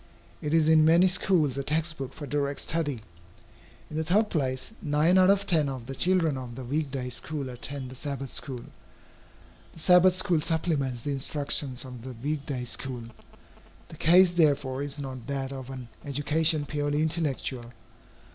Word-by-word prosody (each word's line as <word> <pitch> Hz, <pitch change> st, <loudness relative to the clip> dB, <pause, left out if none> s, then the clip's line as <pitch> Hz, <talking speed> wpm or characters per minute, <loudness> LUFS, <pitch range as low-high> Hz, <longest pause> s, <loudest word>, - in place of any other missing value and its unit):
It 150 Hz, -, -3 dB
is 160 Hz, -2 st, +4 dB
in 160 Hz, -1 st, +6 dB
many 165 Hz, +3 st, +6 dB
schools 175 Hz, -7 st, +2 dB
a -, -, -2 dB
text 155 Hz, +2 st, -1 dB
book 135 Hz, -2 st, -4 dB
for 150 Hz, -, -8 dB
direct 140 Hz, 0 st, -1 dB
study. 145 Hz, -8 st, -2 dB, 0.8 s
In 155 Hz, -, -6 dB
the 160 Hz, -, 0 dB
third 210 Hz, +7 st, +2 dB
place, 130 Hz, 0 st, -2 dB
nine 150 Hz, +4 st, +3 dB
out 185 Hz, 0 st, +6 dB
of 200 Hz, 0 st, +3 dB
ten 160 Hz, -7 st, +2 dB
of 130 Hz, -3 st, -6 dB
the 135 Hz, -, -6 dB
children 165 Hz, -1 st, +1 dB
of 120 Hz, -2 st, -8 dB
the 130 Hz, -, -7 dB
week 145 Hz, +3 st, -1 dB
day 130 Hz, -2 st, -4 dB
school 140 Hz, +1 st, -4 dB
attend 130 Hz, +1 st, -6 dB
the -, -, -9 dB
Sabbath 135 Hz, -1 st, -5 dB
school. 125 Hz, +1 st, -4 dB, 1.1 s
The -, -, -13 dB
Sabbath 180 Hz, +2 st, +6 dB
school 180 Hz, -4 st, +2 dB
supplements 150 Hz, -7 st, -1 dB
the 145 Hz, -, -2 dB
instructions 140 Hz, -2 st, -1 dB
of 125 Hz, -2 st, -9 dB
the 130 Hz, +2 st, -7 dB
week 140 Hz, +4 st, -4 dB
day 130 Hz, -4 st, -3 dB
school. 125 Hz, 0 st, -4 dB, 0.9 s
The 160 Hz, -, -11 dB
case, 175 Hz, +3 st, +6 dB
therefore, 140 Hz, -6 st, +2 dB
is 145 Hz, 0 st, -3 dB
not 130 Hz, -4 st, -7 dB
that 135 Hz, -1 st, -3 dB
of 130 Hz, -1 st, -7 dB
an 130 Hz, -2 st, -7 dB, 0.2 s
education 150 Hz, +2 st, +1 dB
purely 145 Hz, +1 st, -1 dB
intellectual. 140 Hz, -6 st, -2 dB
145 Hz, 175 wpm, -27 LUFS, 130-160 Hz, 1.1 s, in